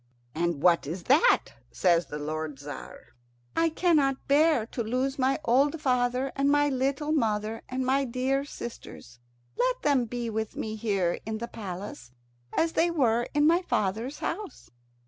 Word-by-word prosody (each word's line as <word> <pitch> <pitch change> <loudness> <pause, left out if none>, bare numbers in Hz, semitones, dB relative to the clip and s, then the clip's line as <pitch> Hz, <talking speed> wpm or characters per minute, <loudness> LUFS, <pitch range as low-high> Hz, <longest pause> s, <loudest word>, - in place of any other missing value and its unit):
"And 170 -2 -1
what 170 -5 +4
is 170 +4 -5
that?" 295 - +4 0.2
says 175 -2 +2
the 150 - -6
lord 155 0 -4
Tzar. 145 -3 -10 0.4
"I 330 0 +3
cannot 305 -5 +1
bear 290 -4 +4
to 235 - -5
lose 255 +5 -1
my 265 +1 +2
old 280 +6 +3
father 255 -1 +1
and 275 0 +2
my 290 0 +3
little 275 +3 -1
mother 220 -5 0
and 255 0 -2
my 270 +2 +2
dear 260 +3 0
sisters. 125 - -9 0.4
Let - - +1
them 275 -4 +3
be 240 +1 -4
with 220 -1 -3
me 220 0 -4
here 200 -5 0
in 220 0 -2
the 235 +2 -5
palace, 195 - -7 0.4
as 325 0 +1
they 340 +2 +3
were 240 -8 +1
in 295 0 +4
my 340 +3 +4
father's 225 - -1
house." 405 +2 -5
250 Hz, 160 wpm, -27 LUFS, 210-285 Hz, 0.4 s, what